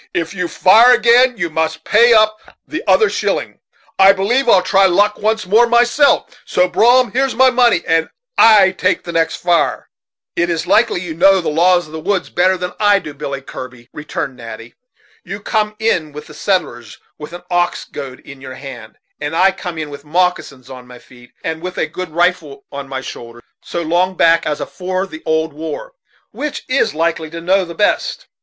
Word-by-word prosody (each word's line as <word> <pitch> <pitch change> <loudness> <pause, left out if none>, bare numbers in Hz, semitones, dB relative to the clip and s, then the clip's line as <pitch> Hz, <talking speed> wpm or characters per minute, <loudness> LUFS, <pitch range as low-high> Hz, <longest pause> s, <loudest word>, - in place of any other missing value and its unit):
If 165 0 -2
you 180 -2 -3
fire 225 +9 +5
agin 245 +1 +3
you 175 -4 -3
must 160 0 -2
pay 235 +3 +4
up 215 -1 +3 0.3
the - - -5
other 440 - +4
shilling. - - -3 0.4
I 195 +1 +7
b'lieve 235 +7 0
I'll 185 -5 +5
try 195 +1 +3
luck 205 +3 +1
once 220 0 -1
more 220 +6 +4
myself; 240 +5 +2
so, 180 - +1
Brom, 240 +7 +3
here's 265 +1 -1
my 260 +1 +4
money, 240 -8 +2
and 165 0 +1 0.3
I 205 -4 +6
take 185 - -1
the 170 - -7
next 165 -1 0
fire." 175 -1 -1 0.5
"It's 170 -1 -1
likely 175 - +2
you 175 -3 -6
know 190 +4 +4
the 175 - -3
laws 175 +3 +2
of 155 - -15
the 160 - -5
woods 190 +4 -2
better 185 +2 +2
than 180 0 -5
I 205 -1 +4
do, 150 -6 -7
Billy 140 -1 -6
Kirby," 125 -2 -10
returned 150 -2 -5
Natty. 115 0 -10 0.5
"You 200 - -7
come 210 0 -2
in 180 -9 -1
with 150 0 -9
the 150 - -14
settlers, 120 - -3 0.2
with 150 +2 -9
an 175 0 -10
ox 175 0 0
goad 135 -3 -9
in 140 -2 -13
your 130 -1 -9
hand, 120 -5 -11 0.2
and 145 +2 -4
I 190 +3 +4
come 180 -3 -7
in 155 -2 -5
with 140 0 -10
moccasins 155 -5 -2
on 130 -2 -11
my 125 0 -13
feet, 125 0 -18
and 160 0 -4
with 180 +1 -7
a - - 0
good 180 +3 -7
rifle 165 -4 -1
on 140 -1 -8
my 135 -1 -5
shoulders, 120 -2 -10 0.2
so 170 - -4
long 180 +3 0
back 165 -1 +3
as 150 -1 -2
afore 185 +1 -4
the 160 -4 -11
old 160 -1 0
war. 160 - -7 0.4
Which 300 -1 -5
is 255 - 0
likely 160 0 -1
to 165 +1 -8
know 185 +3 +1
the 170 -1 -10
best? 210 - -1
175 Hz, 195 wpm, -16 LUFS, 150-205 Hz, 0.5 s, I